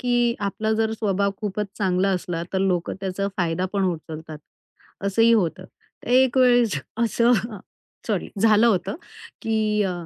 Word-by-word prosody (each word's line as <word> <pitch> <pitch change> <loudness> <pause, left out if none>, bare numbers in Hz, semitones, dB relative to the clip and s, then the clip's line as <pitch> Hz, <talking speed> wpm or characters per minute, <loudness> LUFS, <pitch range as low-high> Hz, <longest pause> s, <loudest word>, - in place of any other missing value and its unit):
की 240 -1 +1
आपला 215 +2 -1
जर 220 0 0
स्वभाव 200 -2 0
खूपच 210 0 -2
चांगला 190 -1 +1
असला, 175 -2 -2
तर 190 - +1
लोकं 185 -3 0
त्याचा 195 +1 -2
फायदा 175 0 0
पण 195 -1 0
उचलतात, 160 -2 -5 0.7
असंही 225 +4 +4
होतं. 185 -4 +1
तर - - -18
एक 260 0 +4
वेळेस 245 - +4 0.2
असं 235 +1 +2
हं, 215 0 -4 0.5
सॉरी, 210 -5 -1
झालं 220 +1 +5
होतं, 200 -6 +1 0.5
की 215 -1 +1
अ, 185 - -1
205 Hz, 150 wpm, -23 LUFS, 185-225 Hz, 0.7 s, झालं